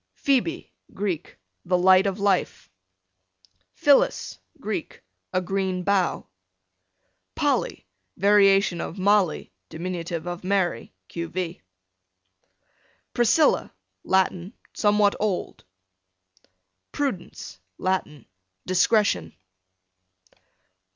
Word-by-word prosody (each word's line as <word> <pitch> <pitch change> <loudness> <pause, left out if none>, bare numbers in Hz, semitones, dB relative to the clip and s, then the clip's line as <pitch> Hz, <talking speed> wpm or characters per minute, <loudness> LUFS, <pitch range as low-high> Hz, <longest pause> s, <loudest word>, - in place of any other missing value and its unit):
Phoebe, 280 +5 -1 0.2
Greek, 190 -6 -4 0.3
the 180 0 +1
light 185 +2 +5
of 195 +1 -3
life. 200 -2 0 1.0
Phyllis, 285 -1 +2 0.2
Greek, 210 - -5 0.3
a 185 - 0
green 190 0 -2
bough. 195 -1 0 1.1
Polly, - - -1 0.3
variation 195 -2 +4
of 170 - -6
Molly, 190 - +1 0.2
dim. 165 +2 -7 0.4
of 175 0 -5
Mary, 190 -2 -1
q. 170 0 -5
v. 180 -1 -5 1.5
Priscilla, 240 +6 +3 0.3
Latin, 190 +1 0 0.2
somewhat 205 -1 +3
old. 205 -4 -2 1.3
Prudence, 255 - -4 0.2
Latin, 185 -6 -2 0.4
discretion. 185 - +2
190 Hz, 75 wpm, -24 LUFS, 180-205 Hz, 1.5 s, light